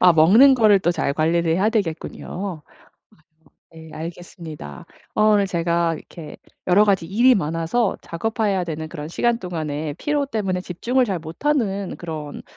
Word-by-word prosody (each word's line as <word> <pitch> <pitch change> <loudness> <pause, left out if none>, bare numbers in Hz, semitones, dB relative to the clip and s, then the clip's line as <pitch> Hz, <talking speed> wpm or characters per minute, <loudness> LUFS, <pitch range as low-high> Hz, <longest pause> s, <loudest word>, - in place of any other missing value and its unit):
아 180 -1 +7
먹는 215 - +7
거를 215 -5 +5
또 175 - +1
잘 140 -5 -1
관리를 165 +2 +1
해야 190 +6 +2
되겠군요. 185 -3 -4 1.1
예 160 0 -12
알겠습니다. 160 - -9 0.3
어 215 - +2
오늘 210 -2 +4
제가 170 -1 0
이렇게 155 -1 -10 0.3
여러 195 +4 +5
가지 195 -5 +1
일이 240 +8 +4
많아서 165 +5 0
작업해야 205 +1 -1
되는 160 -2 -5
그런 155 -2 -7
시간 235 +6 0
동안에 155 -5 -4
피로 290 - -1
때문에 195 -7 -2
집중을 240 +9 0
잘 195 -6 -2
못하는 200 - -2
그런 155 -4 -7
180 Hz, 315 characters per minute, -22 LUFS, 160-215 Hz, 1.1 s, 아